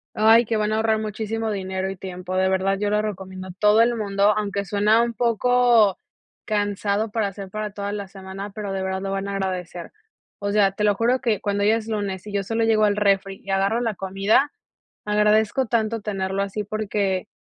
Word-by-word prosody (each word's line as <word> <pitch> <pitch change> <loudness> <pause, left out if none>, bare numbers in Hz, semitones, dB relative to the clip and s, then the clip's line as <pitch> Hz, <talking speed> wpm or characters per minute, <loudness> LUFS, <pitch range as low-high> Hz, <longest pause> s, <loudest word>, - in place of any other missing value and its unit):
Ay, 225 +2 +6
que 225 0 -1
van 215 0 0
a 215 - +1
ahorrar 220 0 +1
muchísimo 220 +1 -3
dinero 190 -1 -3
y 195 - -6
tiempo, 185 0 -6
de 190 0 +2
verdad, 190 +1 +1
yo 205 0 0
lo 210 +1 +2
recomiendo 190 -2 -6
todo 210 +1 +5
el 235 +1 +3
mundo, 200 -1 +2
aunque 200 -1 -2
suena 210 +4 +3
un 235 0 -2
poco 235 -2 +3 0.5
cansado, 205 0 -1
para 220 -2 0
hacer 195 -1 -8
para 215 +1 -4
toda 200 0 -4
la 205 -1 -5
semana, 195 +1 -8
pero 205 -1 -5
de 195 - -2
verdad 190 0 -2
lo 195 0 -3
van 195 0 -2
a 200 - -4
agradecer, 180 -3 -4 0.5
o 200 0 -2
sea, 200 -2 +3
te 210 +2 -4
lo 205 -1 +3
juro 240 +4 +2
que 230 -6 0
cuando 200 0 -1
ya 215 +2 +4
es 225 -1 -4
lunes 200 -4 -3
y 210 - -7
yo 200 -1 -1
solo 225 +3 -1
llego 220 -1 +3
al 205 0 +2
refri 195 -1 +1
y 195 - -12
agarro 195 +4 +1
la 225 -4 -1
comida, 195 +9 +1 0.6
agradezco 210 +4 +2
tanto 225 -1 0
tenerlo 195 -1 -2
así 200 +2 -4
porque 205 -2 -2
205 Hz, 205 wpm, -23 LUFS, 195-215 Hz, 0.6 s, Ay